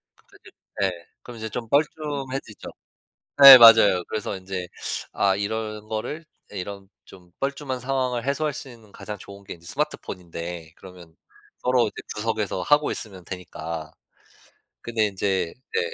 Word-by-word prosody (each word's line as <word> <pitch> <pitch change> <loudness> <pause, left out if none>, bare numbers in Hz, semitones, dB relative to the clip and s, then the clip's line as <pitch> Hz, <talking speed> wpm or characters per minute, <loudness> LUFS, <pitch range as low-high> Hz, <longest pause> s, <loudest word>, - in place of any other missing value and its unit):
그 - - -23
뒤로 - - -17 0.3
예. 95 - +2 0.3
그럼 120 -2 -10
이제 110 0 -5
좀 115 0 -5
뻘쭘해지죠. 140 -5 -2 0.7
네 135 -2 +14
맞아요. 110 -6 +8
그래서 105 -2 -3
인제 95 -1 -6 0.4
아 100 -1 +2
이런 110 +1 -4
거를 110 +9 -4 0.3
이런 100 +1 -7 0.2
좀 90 -2 -17
뻘쭘한 140 -1 -3
상황을 125 -2 -1
해소할 150 +2 0
수 140 -1 -7
있는 115 -4 -15
가장 105 - -7
좋은 100 +1 -12
게 95 - -8
이제 85 0 -17
스마트폰인데 85 -2 -5
그러면 90 -3 -14 0.4
서로 125 -2 +2
이제 - - -13 0.2
구석에서 105 -3 -2
하고 145 0 +3
있으면 95 -5 -4
되니까. 85 -4 -7 0.9
근데 115 -2 0
인제 95 -3 -1 0.2
네 455 - +2
105 Hz, 300 characters per minute, -24 LUFS, 95-125 Hz, 0.9 s, 네